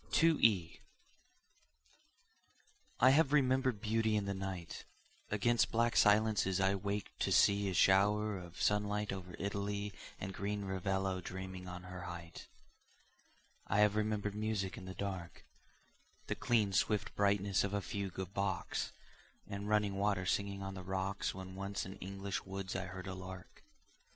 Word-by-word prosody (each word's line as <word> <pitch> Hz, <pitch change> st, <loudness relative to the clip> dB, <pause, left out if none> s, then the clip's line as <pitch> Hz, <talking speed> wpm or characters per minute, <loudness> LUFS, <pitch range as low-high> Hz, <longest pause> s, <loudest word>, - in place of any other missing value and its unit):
To 165 Hz, 0 st, +5 dB
E. 90 Hz, -7 st, +3 dB, 2.2 s
I 130 Hz, +2 st, +7 dB
have 145 Hz, 0 st, +4 dB
remembered 130 Hz, -5 st, +3 dB
beauty 110 Hz, 0 st, +1 dB
in 105 Hz, -1 st, +1 dB
the 100 Hz, -, -1 dB
night, 95 Hz, -3 st, -5 dB, 0.4 s
Against 105 Hz, -1 st, +2 dB
black 115 Hz, +1 st, +2 dB
silences 105 Hz, -3 st, +4 dB
I 95 Hz, +1 st, +3 dB
waked 100 Hz, +1 st, -3 dB
to -, -, 0 dB
see 100 Hz, 0 st, +4 dB
A 95 Hz, -, -2 dB
shower 105 Hz, +3 st, +4 dB
of 85 Hz, -1 st, -10 dB
sunlight 105 Hz, 0 st, +1 dB
over 90 Hz, -2 st, -7 dB
Italy 100 Hz, 0 st, -2 dB, 0.3 s
And 95 Hz, -, -4 dB
green 100 Hz, +2 st, -3 dB
Ravello 95 Hz, 0 st, -1 dB
dreaming 95 Hz, 0 st, -6 dB
on 90 Hz, 0 st, -7 dB
her 90 Hz, +1 st, -7 dB
height; 85 Hz, -2 st, -8 dB, 1.2 s
I 105 Hz, -, +3 dB
have 105 Hz, 0 st, +4 dB
remembered 105 Hz, -1 st, 0 dB
music 105 Hz, -2 st, -2 dB
in 100 Hz, -6 st, -9 dB
the 95 Hz, 0 st, -7 dB
dark, 95 Hz, -3 st, -5 dB, 0.8 s
The -, -, -1 dB
clean 110 Hz, -5 st, +2 dB
swift 105 Hz, +3 st, +1 dB
brightness 100 Hz, -1 st, +2 dB
of 100 Hz, 0 st, -1 dB
a -, -, +2 dB
fugue 95 Hz, 0 st, -4 dB
of 95 Hz, 0 st, -4 dB
Bach's, 100 Hz, -2 st, -2 dB, 0.5 s
And 100 Hz, +1 st, -5 dB
running 105 Hz, -2 st, +2 dB
water 100 Hz, -2 st, +1 dB
singing 100 Hz, +1 st, -1 dB
on 95 Hz, 0 st, -4 dB
the 95 Hz, -, -6 dB
rocks 95 Hz, +2 st, -2 dB
When 95 Hz, -1 st, -7 dB
once 100 Hz, +1 st, -3 dB
in 95 Hz, +1 st, -8 dB
English 100 Hz, +1 st, -4 dB
woods 95 Hz, 0 st, -5 dB
I 95 Hz, 0 st, -2 dB
heard 95 Hz, 0 st, -7 dB
a 95 Hz, -, -4 dB
lark. 95 Hz, 0 st, -9 dB
100 Hz, 150 wpm, -35 LUFS, 95-105 Hz, 2.2 s, I